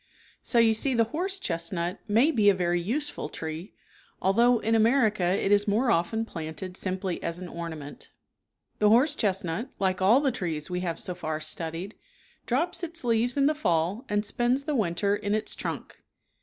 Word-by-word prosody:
So 240 Hz, -, -1 dB
you 230 Hz, -1 st, +6 dB
see 255 Hz, +4 st, +1 dB
the 230 Hz, -, +4 dB
horse 380 Hz, +5 st, -2 dB
chestnut 170 Hz, -, -3 dB
may 230 Hz, +9 st, +4 dB
be 215 Hz, -8 st, +4 dB
a 200 Hz, -, +4 dB
very 175 Hz, -1 st, 0 dB
use 275 Hz, -, 0 dB
ful -, -, -6 dB
tree, 160 Hz, +4 st, -6 dB, 0.5 s
although 235 Hz, +6 st, +4 dB
in 225 Hz, 0 st, -1 dB
America 225 Hz, -2 st, +3 dB
it 190 Hz, +2 st, +1 dB
is 205 Hz, 0 st, +4 dB
more 230 Hz, +4 st, +2 dB
often 220 Hz, +6 st, 0 dB
planted 165 Hz, 0 st, -7 dB
simply 185 Hz, -1 st, -3 dB
as 170 Hz, 0 st, -2 dB
an 180 Hz, 0 st, -7 dB
ornament. 160 Hz, -4 st, -8 dB, 0.7 s
The 210 Hz, -, +4 dB
horse 255 Hz, +7 st, +5 dB
chestnut, 195 Hz, -, -1 dB
like 190 Hz, -1 st, 0 dB
all 215 Hz, +8 st, +6 dB
the 280 Hz, -2 st, +1 dB
trees 170 Hz, -8 st, -4 dB
we 180 Hz, -, -1 dB
have 175 Hz, -2 st, -3 dB
so 180 Hz, -, -3 dB
far 155 Hz, -3 st, -4 dB
studied, 165 Hz, +5 st, -4 dB, 0.5 s
drops 335 Hz, +10 st, 0 dB
its 335 Hz, -2 st, -4 dB
leaves 240 Hz, +2 st, +1 dB
in 275 Hz, -, +4 dB
the 300 Hz, -, +4 dB
fall 180 Hz, -, 0 dB
and 205 Hz, +1 st, 0 dB
spends 240 Hz, +5 st, +1 dB
the 300 Hz, +1 st, -2 dB
winter 200 Hz, -3 st, +1 dB
in 205 Hz, 0 st, -1 dB
its 215 Hz, -, -1 dB
trunk. -, -, -6 dB
205 Hz, 185 wpm, -27 LUFS, 175-240 Hz, 0.7 s, you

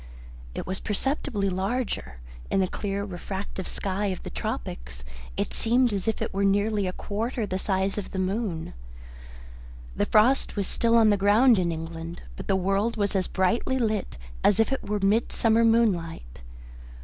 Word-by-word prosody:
It -, -, -4 dB
was 190 Hz, +1 st, -3 dB
perceptibly 220 Hz, -1 st, -1 dB
larger; 190 Hz, -, -2 dB, 0.3 s
in -, -, +2 dB
the 190 Hz, -, +2 dB
clear 200 Hz, +1 st, -3 dB
refractive 190 Hz, 0 st, -5 dB
sky 200 Hz, +1 st, -2 dB
of 185 Hz, -2 st, -3 dB
the -, -, -6 dB
tropics -, -, -5 dB, 0.3 s
it -, -, -2 dB
seemed 240 Hz, 0 st, +2 dB
as 200 Hz, +1 st, -2 dB
if 225 Hz, -, 0 dB
it -, -, -5 dB
were 195 Hz, +1 st, 0 dB
nearly 205 Hz, 0 st, +2 dB
a -, -, -1 dB
quarter 225 Hz, +5 st, -3 dB
the 185 Hz, -1 st, -3 dB
size 195 Hz, +1 st, 0 dB
of 200 Hz, -, -6 dB
the -, -, -6 dB
moon. 185 Hz, -, -2 dB, 1.2 s
The -, -, 0 dB
frost 240 Hz, +6 st, +3 dB
was 200 Hz, -2 st, 0 dB
still 230 Hz, +3 st, +2 dB
on 220 Hz, -2 st, +6 dB
the 205 Hz, -, +3 dB
ground 210 Hz, +4 st, +5 dB
in 175 Hz, -2 st, +1 dB
England, 165 Hz, +1 st, -6 dB
but -, -, -8 dB
the 195 Hz, -, +2 dB
world 195 Hz, +5 st, 0 dB
was 205 Hz, -1 st, 0 dB
as 190 Hz, -1 st, +1 dB
brightly 200 Hz, +7 st, +1 dB
lit 215 Hz, -, -1 dB, 0.3 s
as 205 Hz, -, +4 dB
if 225 Hz, -, +3 dB
it 270 Hz, -, -3 dB
were 210 Hz, -, +1 dB
midsummer 225 Hz, +2 st, +3 dB
moonlight. 170 Hz, -, +1 dB
200 Hz, 170 wpm, -26 LUFS, 185-225 Hz, 1.2 s, on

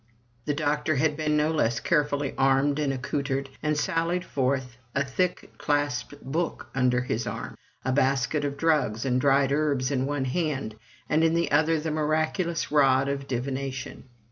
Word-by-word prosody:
The 145 Hz, -, 0 dB
doctor 150 Hz, 0 st, 0 dB
had 150 Hz, +2 st, +2 dB
been 150 Hz, 0 st, 0 dB
no 150 Hz, +1 st, +2 dB
less 120 Hz, -7 st, +1 dB
carefully 145 Hz, -3 st, 0 dB
armed 135 Hz, +2 st, +2 dB
and 145 Hz, -2 st, +1 dB
accoutred, 135 Hz, +1 st, -2 dB
and 150 Hz, -1 st, 0 dB
sallied 170 Hz, +2 st, 0 dB
forth, 130 Hz, -2 st, -1 dB, 0.2 s
a 140 Hz, 0 st, +1 dB
thick 175 Hz, +7 st, -1 dB
clasped 145 Hz, -4 st, -1 dB
book 165 Hz, +6 st, -3 dB
under 125 Hz, -1 st, +2 dB
his 120 Hz, -2 st, -2 dB
arm, -, -, -5 dB, 0.3 s
a 130 Hz, -, +1 dB
basket 135 Hz, +2 st, +1 dB
of 140 Hz, -1 st, -2 dB
drugs 140 Hz, -8 st, +1 dB
and 125 Hz, -1 st, +1 dB
dried 140 Hz, 0 st, +3 dB
herbs 140 Hz, -3 st, +1 dB
in 135 Hz, -1 st, 0 dB
one 145 Hz, -2 st, -1 dB
hand, 135 Hz, -5 st, -2 dB, 0.3 s
and 155 Hz, +1 st, +2 dB
in 165 Hz, 0 st, +3 dB
the 170 Hz, 0 st, 0 dB
other 160 Hz, +2 st, +3 dB
the 160 Hz, +1 st, -3 dB
miraculous 155 Hz, +3 st, 0 dB
rod 135 Hz, -2 st, +4 dB
of 140 Hz, 0 st, -3 dB
divination. 130 Hz, +1 st, -4 dB
140 Hz, 165 wpm, -26 LUFS, 130-155 Hz, 0.3 s, rod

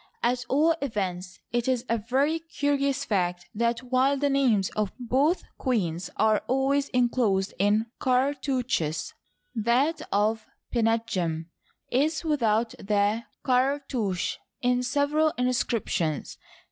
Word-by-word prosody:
At 245 Hz, +1 st, +1 dB
all 310 Hz, +5 st, +4 dB
events, 190 Hz, -8 st, -3 dB
it 240 Hz, +1 st, 0 dB
is 255 Hz, -2 st, 0 dB
a 230 Hz, 0 st, +1 dB
very 275 Hz, +9 st, +1 dB
curious 280 Hz, -3 st, -1 dB
fact 180 Hz, -5 st, -1 dB
that 235 Hz, +3 st, 0 dB
while 265 Hz, +2 st, +3 dB
the 285 Hz, 0 st, +1 dB
names 240 Hz, -9 st, +2 dB
of 210 Hz, -3 st, -1 dB
both 270 Hz, +8 st, +1 dB, 0.2 s
queens 185 Hz, -, -1 dB
are 215 Hz, +1 st, +3 dB
al 265 Hz, +1 st, +2 dB
ways 280 Hz, 0 st, +1 dB
inclosed 235 Hz, -6 st, +1 dB
in 205 Hz, +3 st, +3 dB
cartouches, 255 Hz, -, 0 dB, 0.4 s
that 245 Hz, +8 st, +1 dB
of 215 Hz, +2 st, +1 dB, 0.3 s
Pinetjem 220 Hz, -9 st, 0 dB, 0.4 s
is 300 Hz, +7 st, +1 dB
without 230 Hz, -7 st, +1 dB
the 205 Hz, +3 st, +1 dB, 0.2 s
cartouche 255 Hz, -7 st, 0 dB, 0.2 s
in 250 Hz, 0 st, +2 dB
several 290 Hz, +4 st, +1 dB
inscriptions. 235 Hz, -, -1 dB
245 Hz, 115 wpm, -27 LUFS, 210-275 Hz, 0.4 s, all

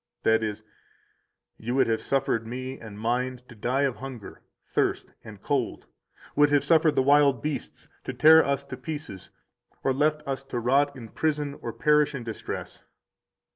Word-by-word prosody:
That 110 Hz, 0 st, +3 dB
is: 110 Hz, -1 st, -3 dB, 1.0 s
You 120 Hz, +3 st, -3 dB
would 135 Hz, -, +4 dB
have 115 Hz, -1 st, 0 dB
suffered 130 Hz, -4 st, 0 dB
Me 130 Hz, +2 st, -5 dB
and 110 Hz, -3 st, -10 dB
Mine 125 Hz, +3 st, -1 dB
to -, -, -12 dB
die 125 Hz, +5 st, 0 dB
of 135 Hz, -4 st, 0 dB
hunger, 130 Hz, -6 st, -9 dB, 0.2 s
thirst, -, -, -1 dB
and -, -, -12 dB
cold, -, -, -1 dB, 0.5 s
would 145 Hz, 0 st, +5 dB
have 145 Hz, -1 st, +3 dB
suffered 160 Hz, -2 st, +4 dB
the 130 Hz, -, +3 dB
wild 140 Hz, -2 st, +4 dB
beasts 150 Hz, -2 st, -4 dB, 0.2 s
to -, -, -3 dB
tear 160 Hz, +1 st, +7 dB
us 140 Hz, 0 st, -1 dB
to -, -, -8 dB
pieces, 150 Hz, -, -7 dB, 0.5 s
or 135 Hz, -, +2 dB
left 150 Hz, +2 st, +1 dB
us 135 Hz, 0 st, -3 dB
to 125 Hz, -3 st, -3 dB
rot 140 Hz, +4 st, +2 dB
in 115 Hz, -4 st, -9 dB
prison 150 Hz, 0 st, -1 dB
or -, -, -4 dB
perish 150 Hz, -1 st, +2 dB
in 125 Hz, -, -5 dB
distress. 115 Hz, -2 st, -6 dB
135 Hz, 170 wpm, -26 LUFS, 120-145 Hz, 1.0 s, tear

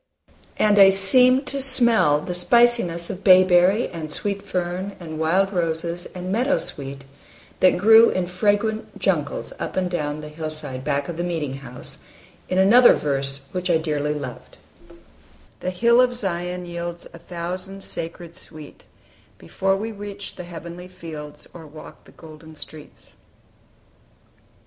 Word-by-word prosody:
And 205 Hz, -1 st, +3 dB
I 195 Hz, -1 st, +8 dB
seemed 250 Hz, +8 st, +7 dB
to 275 Hz, +2 st, +1 dB
smell 235 Hz, -, +4 dB
the 180 Hz, -, -6 dB
spiciness 180 Hz, -3 st, +3 dB
of 185 Hz, -, -9 dB
bay 185 Hz, -1 st, +7 dB
berry 185 Hz, +5 st, +2 dB
and 160 Hz, -3 st, -8 dB
sweet 200 Hz, +3 st, -2 dB
fern 185 Hz, 0 st, -5 dB
and 160 Hz, -3 st, -8 dB
wild 190 Hz, +5 st, 0 dB
roses 170 Hz, 0 st, -3 dB
and 180 Hz, +1 st, -6 dB
meadow 250 Hz, +7 st, +1 dB
sweet 140 Hz, 0 st, -5 dB, 0.5 s
that 185 Hz, -, +3 dB
grew 225 Hz, +4 st, +6 dB
in 185 Hz, -, -2 dB
fragrant 205 Hz, +4 st, -2 dB
jungles -, -, -2 dB
up -, -, -6 dB
and 185 Hz, -1 st, -2 dB
down 150 Hz, -3 st, -4 dB
the 150 Hz, -, -9 dB
hillside 155 Hz, -4 st, -4 dB
back 140 Hz, -1 st, -2 dB
of 170 Hz, -, -7 dB
the 175 Hz, -, -3 dB
meeting 155 Hz, -6 st, -4 dB
house, 130 Hz, -2 st, -6 dB, 0.5 s
in 185 Hz, -, -2 dB
another 230 Hz, +6 st, +6 dB
verse 140 Hz, -1 st, -1 dB
which 180 Hz, 0 st, -4 dB
I 170 Hz, -, +3 dB
dearly 150 Hz, -2 st, -3 dB
loved: 150 Hz, -, -9 dB, 1.0 s
"The 185 Hz, -, -4 dB
hill 235 Hz, +6 st, +3 dB
of 250 Hz, -1 st, +1 dB
Zion 180 Hz, -4 st, -4 dB
yields 170 Hz, 0 st, -7 dB
A 170 Hz, -, -12 dB
thousand 180 Hz, +3 st, -7 dB
sacred 170 Hz, 0 st, -7 dB
sweet, 155 Hz, -5 st, -12 dB, 0.5 s
Before 195 Hz, -, -2 dB
we 220 Hz, +3 st, -5 dB
reach 205 Hz, -1 st, -9 dB
the 180 Hz, -, -9 dB
heavenly 170 Hz, +1 st, -10 dB
fields, 155 Hz, -5 st, -11 dB
Or 165 Hz, -3 st, -12 dB
walk 155 Hz, +1 st, -14 dB
the -, -, -18 dB
golden 160 Hz, 0 st, -15 dB
streets." 155 Hz, 0 st, -12 dB
175 Hz, 150 wpm, -21 LUFS, 160-200 Hz, 1.0 s, I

